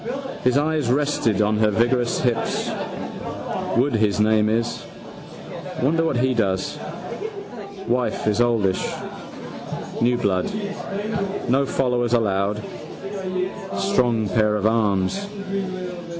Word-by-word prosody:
His 125 +1 +4
eyes 150 -3 +1
rested 130 -7 +2
on 105 +1 +2
her 110 0 +4
vigorous 120 +3 +2
hips. 120 -2 0 1.1
Woods 125 -1 +3
his 105 -1 +2
name 110 0 +4
is. 115 +2 0 1.0
Wonder 160 +6 +3
what 160 -6 +1
he 130 +1 +3
does. 95 -5 0 1.1
Wife 125 0 0
is 105 +2 +3
oldish. 110 -6 +2 1.2
New 120 +1 +4
blood. 95 - +1 1.0
No 135 +3 +3
followers 125 -3 +1
allowed. 105 -2 +1 1.1
Strong 120 - +2
pair 105 +1 +3
of 105 -1 0
arms. 110 - +2
115 Hz, 100 wpm, -23 LUFS, 105-125 Hz, 1.2 s, His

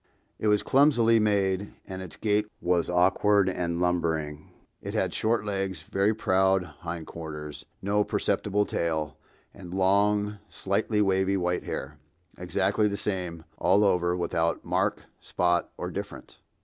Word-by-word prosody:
It 110 - -1
was 105 -1 +3
clumsily 120 -5 +4
made, 100 -2 0
and 95 -1 -7
its 85 -5 -8
gait 105 -1 +1
was 90 -1 +1
awkward 95 +3 +3
and 85 -2 -1
lumbering. 80 -4 -1 0.3
It - - -6
had - - 0
short 110 -1 0
legs, 95 -5 -3
very 100 +4 +1
round 95 -3 +2
hind 85 -1 -5
quarters, 75 -3 -8 0.2
no 105 +1 +2
perceptible 105 0 0
tail, 80 -5 -2 0.3
and 90 -2 -9
long, 105 +2 +2
slightly 105 +2 0
wavy 95 0 +2
white 90 -1 -1
hair, 75 +2 -5 0.4
exactly 105 - +1
the 100 -1 -2
same 90 -5 -3 0.2
all 100 +2 +4
over, 90 -3 +2
without 85 -1 -1
mark, - - 0 0.2
spot 90 -1 0
or - - -4
difference. - - -8
95 Hz, 135 wpm, -27 LUFS, 85-105 Hz, 0.4 s, clumsily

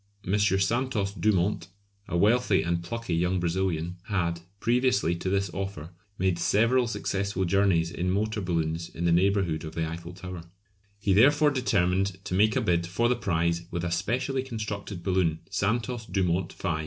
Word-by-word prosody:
M. 95 - +1
Santos 100 +2 +1
Dumont, 100 -3 +1 0.4
a 85 - -1
wealthy 105 +1 +3
and 85 0 -1
plucky 115 +1 -4
young 90 +2 +1
Brazilian, 85 -1 -1
had, 85 -5 -1 0.2
previously 120 -7 +2
to 95 - -3
this 100 -1 0
offer, 95 -5 -5 0.3
made 90 -2 +1
several 115 +7 +3
successful 100 -3 -2
journeys 90 -3 +2
in 90 +1 -2
motor 105 +3 0
balloons 85 -2 -2
in 85 - -4
the 85 - +3
neighbourhood 90 -2 +2
of 80 0 -7
the 80 -1 -1
Eiffel 85 +2 -7
Tower. 90 -1 -7 0.6
He 100 -1 +1
therefore 145 +8 +5
determined 100 -7 +1
to 95 - -4
make 105 +3 +3
a - - +2
bid 85 -1 +1
for 115 +7 +1
the 125 - +3
prize 85 -5 -1
with 85 -1 -3
a 90 - -2
specially 130 +9 -1
constructed 105 -7 -5
balloon 90 -4 +1
"Santos 115 +3 -1
Dumont 90 -2 0
V." 85 -5 -2
95 Hz, 165 wpm, -27 LUFS, 85-105 Hz, 0.6 s, therefore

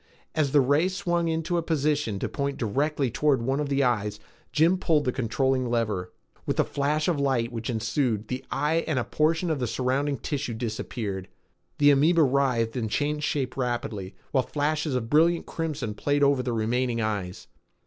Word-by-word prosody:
As 150 -4 +1
the 145 - +5
ray 145 +6 +3
swung 175 -3 -1
into 165 +2 0
a - - -1
position 150 -8 0
to - - -2
point 140 -1 -3
directly 135 +3 0
toward 135 -1 +2
one 135 +4 0
of 145 -1 -2
the 140 0 +2
eyes, 105 -4 0 0.3
Jim 165 +4 +3
pulled 155 -5 +2
the 125 - +2
controlling 130 +1 0
lever. 105 -6 -1 0.4
With - - 0
the - - +4
flash 150 +2 0
of 170 -5 +1
light 130 -4 +1
which 115 -1 -5
ensued, 110 -1 -1
the 125 +2 -4
eye 160 +3 +1
and 155 -4 0
a 125 - +1
portion 160 +5 +1
of 150 - -1
the 125 - -1
surrounding 135 +4 0
tissue 135 -1 -3
disappeared. 110 -4 -4 0.5
The 145 0 +6
amoeba 155 +4 +4
writhed 130 -4 +1
and 115 -4 -2
changed 150 +4 -1
shape 130 -3 -2
rapidly, 120 -6 -3 0.2
while 135 - +3
flashes 150 0 -1
of 120 -3 -1
brilliant 165 +5 +3
crimson 150 -9 -3
played 145 +6 0
over 140 -2 +4
the 125 -1 -2
remaining 115 +2 0
eyes. 100 -5 -3
135 Hz, 180 wpm, -26 LUFS, 115-150 Hz, 0.5 s, The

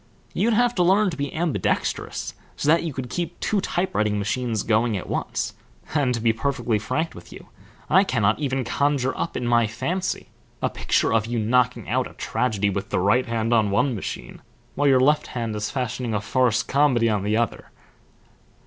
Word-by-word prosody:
"You'd 220 +6 +2
have 245 +1 +3
to 180 - +2
learn 190 +2 +4
to - - -5
be 140 -1 -3
ambidextrous, 165 -2 -1 0.2
so - - -3
that 165 +2 +5
you 165 - -3
could 130 -2 -5
keep 175 +6 -4
two 205 -2 0
type 185 0 -1
writing 105 0 +1
machines 110 +1 -1
going 110 -1 +2
at 90 - -6
once; - - -2 0.4
and, 145 -5 +2
to - - -3
be 115 0 +2
perfectly 120 -2 -1
frank 160 +10 -2
with 85 - -13
you, - - -12 0.4
I 190 +5 +5
cannot 110 - +1
even 135 -3 -1
conjure 135 +2 0
up - - -3
in 125 - -3
my 120 -1 +3
fancy 180 - -3 0.3
a - - -1
picture - - +1
of 110 -1 +2
you 120 0 -2
knocking 125 +3 +1
out - - 0
a - - -16
tragedy 105 -5 0
with 100 0 -4
the - - 0
right 105 +8 +2
hand 115 0 0
on 110 -3 +3
one 125 +6 +2
machine, 105 - -6 0.3
while 145 +1 +1
your 135 -2 +5
left 150 +3 +3
hand 115 -3 -3
is 105 0 -2
fashioning 125 -3 -2
a - - +1
farce 125 0 +2
comedy 135 -5 +3
on 105 -3 0
another." 110 +3 -1
125 Hz, 195 wpm, -24 LUFS, 110-145 Hz, 0.4 s, that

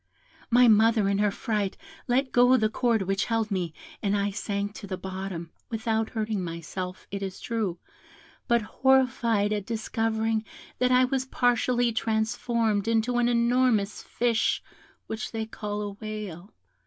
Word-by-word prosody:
My 245 +1 +6
mother 220 -1 +5
in 200 0 +1
her 210 0 +3
fright 205 -1 -2 0.3
let 260 +2 +1
go 245 +1 +6
the 220 -3 +2
cord 230 -2 +1
which 195 +1 0
held 225 -2 -1
me, 180 -4 -1 0.3
and 205 0 +1
I 200 0 0
sank 200 0 -3
to 200 - -8
the 185 -1 -4
bottom, 185 -3 -6 0.2
without 225 -1 -1
hurting 215 -3 -2
myself, 175 +2 -6
it 200 0 -4
is 190 -1 -5
true, 215 -7 -2 0.7
but 235 -2 +3
horrified 240 -4 +2
at 205 -2 -2
discovering 225 -1 -1 0.4
that 250 0 +3
I 255 0 +6
was 260 0 -1
partially 245 -1 +2
transformed 220 -1 0
into 230 +2 +2
an 240 - +3
enormous 235 -3 +2
fish 235 -2 0 0.4
which 220 +2 -5
they 225 -1 -2
call 210 -1 -4
a 205 - -4
whale. 205 -3 -7
220 Hz, 150 wpm, -27 LUFS, 200-235 Hz, 0.7 s, My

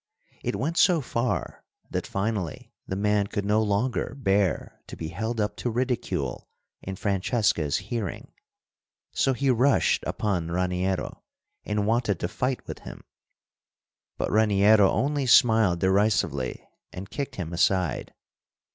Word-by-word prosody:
It - - -1
went 160 +6 -2
so 175 -3 +5
far 125 -2 -2 0.3
that - - -2
finally 100 -4 -3
the 95 - -3
man 105 0 +1
could 100 -1 -3
no 105 +2 +3
longer 110 +5 -1
bear 100 -6 0
to - - -8
be 80 - -5
held 110 +7 -3
up 105 0 -1
to 125 - -2
ridicule 125 +1 -2 0.3
in 95 - -5
Francesca's 100 - +1
hearing, 115 -7 -5 0.8
so 135 - +2
he 135 +1 +1
rushed 130 +3 +3
upon 90 -6 -1
Raniero 90 +1 -1 0.4
and 105 0 -1
wanted 110 -4 +1
to - - 0
fight 125 +6 -2
with - - -7
him. - - -10 1.1
But - - -2
Raniero 105 -1 +5
only 140 +4 0
smiled 110 -8 +5
derisively 95 -9 +1 0.2
and 95 +1 -8
kicked 140 -2 -4
him 85 -2 -5
aside. 90 0 +1
105 Hz, 130 wpm, -26 LUFS, 95-120 Hz, 1.1 s, so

